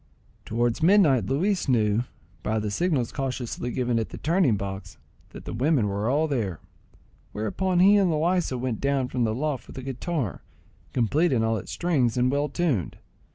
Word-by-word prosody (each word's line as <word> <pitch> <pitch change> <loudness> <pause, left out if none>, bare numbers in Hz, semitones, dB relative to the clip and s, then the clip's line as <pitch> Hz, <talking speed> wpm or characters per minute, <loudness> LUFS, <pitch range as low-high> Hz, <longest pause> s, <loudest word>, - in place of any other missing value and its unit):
Towards 120 +4 0
midnight 155 - +4
Luis 175 - 0
knew, 110 -1 +2 0.4
by 110 +4 -1
the 105 -1 -2
signals 145 - 0
cautiously 130 -3 -3
given 120 -1 0
at 110 - -3
the - - -8
turning 160 - +2
box, 95 0 -6 0.3
that - - -11
the - - -5
women 130 -1 +2
were 100 +3 -1
all 150 +4 +2
there; 110 - -2 0.7
whereupon 175 - -1
he 200 +2 +7
and 195 -3 +3
Loaysa 165 -3 +1
went 125 -3 -3
down 140 -2 0
from 125 -2 0
the 110 0 -1
loft 145 0 -3
with - - -12
the 130 - -7
guitar, 135 - -3 0.5
complete 145 +9 +2
in 115 -4 +2
all 115 0 +1
its 95 - -7
strings 135 -10 +1
and 125 +1 +2
well 145 +1 0
tuned. 140 - -1
130 Hz, 175 wpm, -25 LUFS, 115-160 Hz, 0.7 s, he